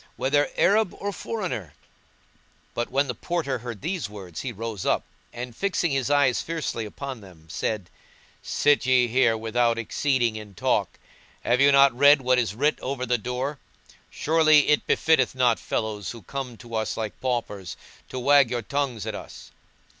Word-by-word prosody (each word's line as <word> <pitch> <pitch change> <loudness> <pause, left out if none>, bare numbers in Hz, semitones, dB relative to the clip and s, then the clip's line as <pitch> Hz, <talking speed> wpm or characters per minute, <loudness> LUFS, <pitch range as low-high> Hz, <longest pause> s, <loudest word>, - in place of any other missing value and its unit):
whether 145 +2 +1
Arab 210 0 +3
or 205 - -2
foreigner."[FN#169] 180 - -4 1.0
But 120 - -2
when 140 +1 +1
the 125 - -2
Porter 140 -1 -2
heard 120 -2 -7
these 165 - -3
words, 95 -5 -8
he 130 - -4
rose 115 -2 -5
up, - - +1 0.3
and 120 -1 -7
fixing 185 -2 0
his 135 -1 0
eyes 140 -4 +3
fiercely 160 -8 -3
upon 130 +3 -7
them, 90 -5 -15
said, 100 0 -2 0.5
"Sit 145 -3 +2
ye 125 -1 +4
here 120 -1 +3
without 115 +1 +1
exceeding 120 0 0
in 105 -2 -10
talk! - - 0 0.5
Have 125 +2 +2
you 140 0 +6
not 140 -2 +6
read 145 +2 +7
what 130 -1 +2
is 110 -4 -1
writ 145 +6 +1
over 130 -1 -3
the 125 -1 +1
door? 125 +5 -3 0.5
surely 155 -2 +4
it 150 - +2
befitteth 145 -6 +2
not 125 -3 +3
fellows 105 -3 -3
who 115 -3 -8
come 130 +2 -6
to 115 +1 -13
us 110 -1 -2
like 110 -2 -5
paupers 115 -7 -3 0.3
to - - -6
wag 140 0 +5
your 120 -1 -2
tongues 135 -3 -2
at - - -3
us." - - -10
125 Hz, 170 wpm, -25 LUFS, 115-145 Hz, 1.0 s, read